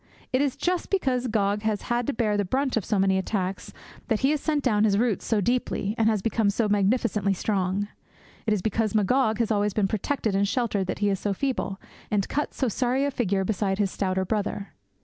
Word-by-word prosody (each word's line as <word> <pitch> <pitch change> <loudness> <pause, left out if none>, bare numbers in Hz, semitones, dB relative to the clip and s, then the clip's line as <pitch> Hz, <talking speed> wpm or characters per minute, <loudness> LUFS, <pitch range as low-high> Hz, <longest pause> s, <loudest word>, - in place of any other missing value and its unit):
It 255 - +3
is 280 -3 0
just 360 0 -1
because 260 -10 +1
Gog 205 -2 +1
has 215 -1 -1
had 240 0 -1
to 285 - 0
bear 220 -3 +1
the 205 - +1
brunt 260 +7 0
of 225 - 0
so 210 - 0
many 190 0 +3
attacks 190 -1 -3 0.4
that 225 -4 0
he 270 - +3
has 300 -2 0
sent 300 -3 0
down 215 -5 +3
his 205 -2 +3
roots 230 -2 +1
so 220 -3 +1
deeply 225 -2 0
and 225 -2 +3
has 215 -3 0
become 225 -2 +2
so 215 +2 +1
magnificently 205 -1 +1
strong. 195 0 -1 0.6
It 215 - +3
is 190 - -4
because 220 0 0
Magog 220 +2 +2
has 230 -1 0
always 205 -1 +1
been 205 -3 +2
protected 220 +2 -1
and 200 +1 +2
sheltered 205 -4 0
that - - -2
he - - +3
is 195 - -1
so 205 -1 -1
feeble, 225 -4 -2 0.3
and 200 -2 0
cuts 295 - -2
so 265 - +1
sorry 255 +4 +1
a 285 - 0
figure 200 -6 0
beside 195 -1 0
his 200 -2 +1
stouter 190 -1 -1
brother. 205 0 -2
215 Hz, 220 wpm, -26 LUFS, 200-245 Hz, 0.6 s, It